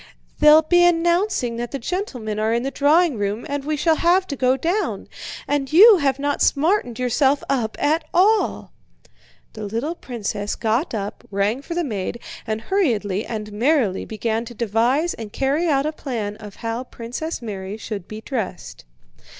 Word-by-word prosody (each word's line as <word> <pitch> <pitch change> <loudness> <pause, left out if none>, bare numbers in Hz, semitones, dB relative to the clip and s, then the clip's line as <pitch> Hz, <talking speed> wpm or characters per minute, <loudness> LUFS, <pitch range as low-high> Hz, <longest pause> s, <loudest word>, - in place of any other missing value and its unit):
"They'll 300 +1 +7
be 350 +2 +4
announcing 345 - +2
that 240 0 -3
the 275 - -4
gentlemen 250 - -4
are 220 +1 +1
in 235 - 0
the 270 - -2
drawing 295 -2 +3
room 205 +5 -2
and 285 -1 -3
we 305 +1 -2
shall 320 +1 +2
have 360 +2 +3
to 280 - -2
go 255 0 +2
down, 350 +10 -1 0.4
and 285 -1 -1
you 410 +6 +9
have 275 -4 +1
not 285 +1 -1
smartened 295 - +2
yourself 265 +3 +2
up 240 -5 -1
at 310 +3 +1
all!" 415 +5 +2 0.8
The 215 - -7
little 230 +10 -2
princess 215 -8 -4
got 230 +5 -1
up, 200 -1 -5
rang 205 +6 0
for 335 +4 -6
the 350 - 0
maid, 220 - -4 0.3
and 220 0 -2
hurriedly 225 - 0
and 215 -2 -5
merrily 235 -4 +1
began 225 +1 -2
to 240 - -10
devise 240 - +1
and 220 -2 -8
carry 285 +8 0
out 280 -2 +2
a 305 - 0
plan 230 -9 -4
of 210 -2 -11
how 230 +1 -4
Princess 250 +7 -6
Mary 200 -3 -6
should 210 -4 -6
be 215 0 -8
dressed. 220 - -5
255 Hz, 170 wpm, -22 LUFS, 220-315 Hz, 0.8 s, you